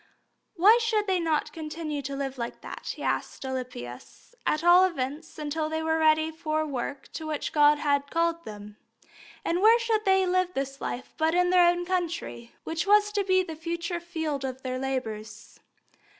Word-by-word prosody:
Why 420 +7 +6
should 445 -2 +1
they 380 -2 +1
not 320 -3 0
continue 310 -2 -4
to 275 0 -5
live 270 -1 -4
like 235 0 -5
that, - - -6
he - - -8
asked - - -2
Alypius, 250 - -7
at 305 +1 +1
all 350 +2 +7
events 315 -1 -3
until 305 +1 -2
they 315 0 -2
were 320 0 +1
ready 315 0 +3
for 310 -1 -2
the - - -1
work 275 -1 -5
to 315 - -5
which 305 -2 -3
God 295 0 +5
had 285 -1 0
called 335 +1 0
them? 210 -2 -10 0.7
And 345 +2 0
where 445 +3 +7
should 455 -2 0
they 385 -1 +4
live 365 0 +1
this 275 0 -3
life 245 - -5
but 320 +1 +2
in 360 0 +3
their 360 -1 +6
own 350 0 0
country, 345 -10 -3
which 325 +4 -3
was 415 0 +5
to 410 -1 0
be 375 -1 +3
the 325 -3 -7
future 340 +2 -3
field 320 -5 -3
of 260 0 -5
their 255 0 -3
labours? 250 -5 -5
320 Hz, 185 wpm, -27 LUFS, 275-355 Hz, 0.7 s, all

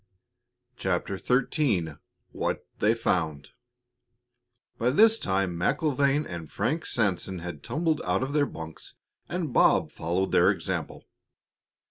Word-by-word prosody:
CHAPTER 95 -1 -1
XIII 125 - +1 0.3
WHAT - - -2
THEY 110 +2 +3
FOUND 80 -10 -1 1.3
By 120 +1 +2
this 220 - +5
time 95 -2 0
MacIlvaine 140 - +1
and 85 -3 -7
Frank 160 +5 -1
Sanson 95 -4 0
had 85 -4 -7
tumbled 160 - -1
out - - 0
of 135 +2 -3
their 145 -1 +3
bunks, 80 -1 -9 0.3
and 170 -7 -3
Bob - - +4
followed 90 +4 -1
their - - +5
example. - - -3
110 Hz, 115 wpm, -27 LUFS, 85-145 Hz, 1.3 s, this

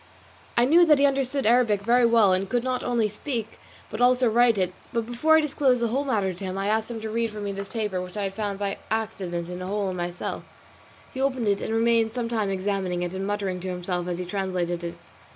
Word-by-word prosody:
I 240 - +5
knew 330 +6 +6
that 300 -2 +6
he 280 - +4
understood 275 0 0
Arabic 225 -3 +3
very 240 +2 +4
well, 225 -5 +5
and 185 +1 -1
could 245 -1 0
not 255 -1 -1
only 235 -3 +1
speak 225 +1 -5 0.3
but - - -4
also 250 0 +4
write 235 -1 +4
it; 185 -1 0 0.2
but 230 -1 -1
before 275 +7 +3
I - - +4
disclosed 275 -4 +2
the 235 -1 0
whole 275 +5 -1
matter 205 -8 0
to 180 - -9
him, 190 0 -4
I 195 +1 -1
asked 220 +1 0
him 235 -2 -5
to 220 - -4
read 230 +1 0
for 215 0 -8
me 205 -1 -3
this 200 0 -5
paper 210 -4 -2
which 180 +2 -8
I 205 - -1
had 195 -1 -2
found 205 -1 -3
by 200 0 -3
accident 195 -6 -3
in 180 +1 -6
a 185 - -5
hole 200 -1 -1
in - - -5
my 175 -1 -2
cell. 175 - -5 0.7
He 260 - -4
opened 260 -4 0
it 200 0 +1
and - - -3
remained 225 0 +2
some 240 -2 -2
time 220 -4 0
examining 190 -2 -1
it 175 0 -4
and 190 +1 -3
muttering 200 -3 -2
to 185 - -6
himself 180 0 -3
as 175 -1 -2
he 180 - -4
translated 180 -2 -2
it. 170 0 -5
210 Hz, 250 wpm, -25 LUFS, 190-240 Hz, 0.7 s, knew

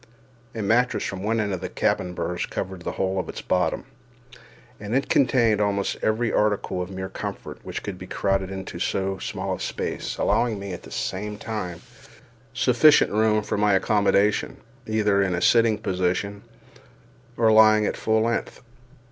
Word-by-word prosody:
A 110 - -3
mattress 120 +5 +2
from 95 -1 -4
one 110 +3 0
of 100 -5 -2
the - - -4
cabin 90 -1 -1
berths 90 0 -2
covered 95 -1 -5
the - - -4
whole 95 0 -1
of - - -4
its - - -7
bottom, 90 -3 0 0.9
and 105 +3 -3
it 135 - 0
contained 120 -5 +3
almost 100 -1 0
every 110 +2 0
article 105 -3 0
of 90 - -5
mere 95 0 -5
comfort 95 - -7
which - - -6
could 95 -3 -6
be 90 - -9
crowded 95 0 0
into 95 -2 -6
so 95 +1 -1
small - - -3
a - - -5
space, - - -4
allowing 115 -3 +1
me, 100 -1 -6
at 90 - -7
the - - -13
same 105 +2 -4
time, 100 -6 -5 0.7
sufficient 130 +4 +4
room 110 0 +2
for 105 - -2
my 105 -1 +4
accommodation, 100 +1 +2 0.3
either 105 -2 +2
in 95 -2 +1
a - - -1
sitting 115 -2 +4
position 95 +2 -2 1.0
or 115 -1 +4
lying 110 -1 +6
at - - -1
full 110 0 +1
length. 115 0 -2
105 Hz, 165 wpm, -24 LUFS, 95-110 Hz, 1.0 s, lying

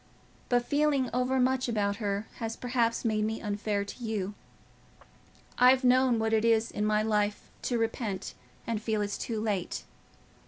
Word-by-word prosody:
But 245 -1 +2
feeling 285 -3 +1
overmuch 255 +1 +1
about 205 -3 0
her 205 -1 -2
has 225 -1 -3
perhaps 240 -2 0
made 215 -1 +1
me 220 +1 -1
unfair 205 -1 -2
to 240 - -9
you. 210 -3 -2 1.3
I've 255 +1 +6
known 255 -1 +4
what 220 0 0
it 220 0 +3
is 230 -1 +3
in 210 +1 -1
my 215 0 +2
life 210 -1 0 0.2
to 245 - +1
repent 225 -3 -2 0.3
and 225 -2 -2
feel 215 -1 0
it's 205 0 -3
too 225 -2 -3
late. 205 -5 -2
225 Hz, 155 wpm, -29 LUFS, 210-245 Hz, 1.3 s, I've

